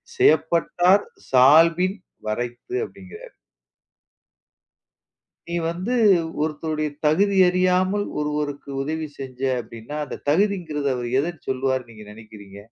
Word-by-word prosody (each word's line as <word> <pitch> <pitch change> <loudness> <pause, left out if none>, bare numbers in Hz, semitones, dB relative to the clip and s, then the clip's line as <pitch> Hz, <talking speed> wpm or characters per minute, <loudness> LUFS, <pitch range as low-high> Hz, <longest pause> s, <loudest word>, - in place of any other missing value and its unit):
செயப்பட்டார் 170 - +3 0.2
சால்பின் 165 +9 +5 0.3
வரைத்து" 120 - -4
அப்படிங்கறாரு. 465 +3 -13 2.2
நீ 170 - -3
வந்து 180 +8 -3 0.5
ஒருத்தருடைய 155 0 -2 0.2
தகுதி 195 +6 +3
அறியாமல் 185 +2 +2 0.2
ஒருவருக்கு 150 -1 -3
உதவி 155 +2 -3
செஞ்ச 130 -2 -8 0.2
அப்படின்னா, 115 +5 -10
அந்த - - -8
தகுதிங்கறது 165 -4 0
அவரு 120 -1 -4
எதை 160 +2 -3
சொல்லுவாருன்னு 130 -2 -1
நீங்க 110 -1 -12
நினைக்கிறீங்க? 105 -2 -13
155 Hz, 95 wpm, -23 LUFS, 130-180 Hz, 2.2 s, சால்பின்